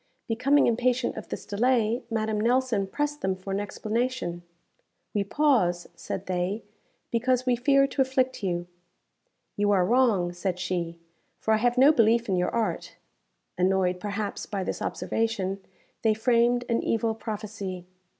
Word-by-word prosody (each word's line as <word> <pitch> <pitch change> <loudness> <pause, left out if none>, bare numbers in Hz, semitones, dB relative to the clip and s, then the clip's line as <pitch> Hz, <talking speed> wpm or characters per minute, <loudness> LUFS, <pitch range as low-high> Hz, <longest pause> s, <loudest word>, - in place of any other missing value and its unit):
Becoming 265 +6 +3
impatient 245 +1 +1
of - - -8
this - - -6
delay, 230 +2 +1
Madame 220 -2 -1
Nelson 235 -4 +1
pressed 295 +7 -2
them 190 0 0
for 190 +1 -6
an 195 - 0
explanation. 215 -3 -2 0.7
"We 205 - +1
pause," 200 - +2
said 190 - -6
they, 185 +4 -2 0.5
"because 250 +2 +1
we 250 -1 +3
fear 275 +3 +4
to 275 0 -1
afflict 260 -1 +1
you." 175 -2 -1 0.9
"You 205 0 +2
are 190 -3 +4
wrong," 215 -7 +2
said 180 0 -2
she, 175 -2 -3 0.4
"for 220 - +1
I - - +4
have 245 +2 +1
no 270 +4 +7
belief 235 -3 +3
in 190 - +1
your 180 0 +1
art." 230 -2 -2 0.6
Annoyed, 185 -1 +2
perhaps, 205 +1 -4
by 200 -2 -3
this - - -4
observation, 200 -4 -2 0.4
they 220 -1 +3
framed 240 +2 +2
an 230 - +1
evil 225 0 0
prophecy. 205 -4 -6
220 Hz, 150 wpm, -27 LUFS, 190-245 Hz, 0.9 s, no